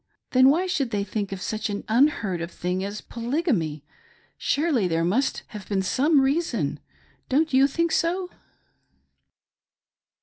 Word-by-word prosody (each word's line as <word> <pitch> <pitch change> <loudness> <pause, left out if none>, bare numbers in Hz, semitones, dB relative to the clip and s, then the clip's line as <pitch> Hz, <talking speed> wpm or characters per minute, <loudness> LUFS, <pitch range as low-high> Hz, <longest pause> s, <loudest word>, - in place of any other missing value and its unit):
Then 260 +1 +6
why 335 +6 +2
should 300 -9 -1
they 205 -3 -1
think 200 0 -3
of 195 -2 -5
such 215 -1 -2
an 205 0 -4
unheard 220 - +2
of 170 - -4
thing 180 +1 -3
as 205 +2 -5
Polygamy 230 - -2 0.3
— - - -33
surely 285 - +1
there 165 -1 0
must 235 +10 0
have 210 -3 -9
been 195 -2 0
some 280 - +3
reason. 265 - 0 0.5
Don't 305 +3 +2
you 265 +1 +6
think 335 +4 0
so 360 +2 0
235 Hz, 145 wpm, -25 LUFS, 195-295 Hz, 0.5 s, Then